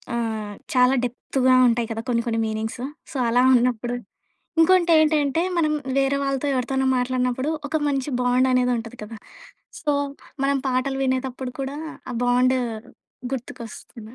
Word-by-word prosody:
ఆహ్, 220 -3 -3 0.2
చాలా 250 +1 +5
డెప్త్‌గా 255 +1 +1
ఉంటాయి 235 0 0
కదా 225 0 -4
కొన్ని 235 -1 +1
కొన్ని 225 -1 0
మీనింగ్స్. 220 +3 -4 0.3
సో 275 - -4
అలా 245 +2 +4
ఉన్నప్పుడు. 245 0 +1 0.7
ఇంకోటేంటంటే 320 -3 +4
మనం 305 -2 +2 0.2
వేరే 275 +1 +2
వాళ్ళతో 275 +1 -1
ఎవరితోనో 265 +1 0
మాట్లాడినప్పుడు 255 +2 0 0.2
ఒక 315 - 0
మంచి 275 -1 -1
బాండ్ 250 +1 +3
అనేదుంటది 245 -1 0
కదా 225 +1 -9 0.7
సో 300 -3 +1 0.5
మనం 280 0 +2
పాటలు 260 +1 0
వినేటప్పుడు 260 -1 -2
కూడా 270 +1 -4 0.3
ఆ - - -4
బాండు 250 +1 +3 0.7
గుర్తుకొస్తుంది. 235 -2 -8
255 Hz, 125 wpm, -23 LUFS, 240-270 Hz, 0.7 s, చాలా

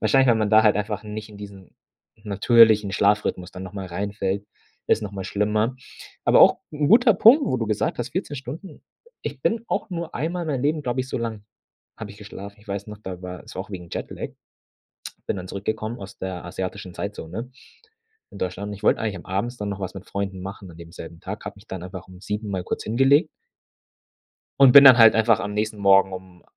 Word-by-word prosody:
wahrscheinlich 135 -1 +3
wenn 115 -2 +4
man 105 -2 0
da 110 0 +6
halt 105 -2 +4
einfach 105 0 -3
nicht 105 +1 -7
in 105 - -12
diesen 100 -2 -12 0.5
natürlichen 105 0 +4
Schlafrhythmus 100 -3 +1
dann 90 - -8
nochmal 95 0 -7
reinfällt, 100 +2 -3 0.4
ist 110 - +2
nochmal 100 -2 -5
schlimmer. 105 +4 0 0.5
Aber - - +5
auch - - +7
'n 150 -1 0
guter 230 +1 +6
Punkt, 235 +10 +7
wo 130 - 0
du 115 - -2
gesagt 105 +2 -1
hast, 120 +1 -3
14 160 -5 -4
Stunden 145 - -9 0.4
ich - - -6
bin 230 0 0
auch - - -2
nur 170 -2 -5
einmal 170 +6 -2
in 160 - -5
meinem 135 -3 -1
Leben, 150 +1 0
glaube 125 -1 -1
ich 130 - -5
so - - -3
lange 115 -3 -4 0.6
habe 110 -2 -7
ich 100 - -12
geschlafen. 100 -1 -10
Ich 105 - -22
weiß 100 +1 -4
noch, 105 - -8
da 95 -4 -8
war 90 -1 -8
es - - -12
auch 95 - -5
wegen 90 -3 -8
Jetlag. - - -5 1.0
Bin - - -1
dann 90 - -7
zurückgekommen 110 +4 -4
aus 95 +1 -10
der 95 -2 -5
asiatischen 95 +1 -6
Zeitzone 100 +4 -6 0.8
in - - -11
Deutschland 95 +3 -4
und 105 - -5
ich 100 - -15
wollte - - +3
eigentlich 110 -3 -2
am 85 - -13
abends 100 +7 -2
dann 105 -2 -4
noch 100 -1 -5
was 95 -2 -5
mit 95 - -9
Freunden 100 -2 -4
machen 95 0 -8
an - - -15
dem 85 0 -12
selben 85 0 -10
Tag. 105 +3 -7
Habe - - -6
mich 100 +3 -19
dann 95 -2 -6
aber 90 0 -7
auch - - -23
um 90 0 -13
7:00 105 +1 -4
mal 95 -2 -3
kurz - - -4
hingelegt 135 +7 +3 1.3
und 135 -2 +8
bin 140 +1 +10
dann 130 -2 +10
halt 115 -1 +8
einfach 110 -1 +3
am 105 0 -4
nächsten 105 0 -2
Morgen 95 -1 +5
um 90 -1 -10
105 Hz, 215 wpm, -23 LUFS, 95-120 Hz, 1.3 s, bin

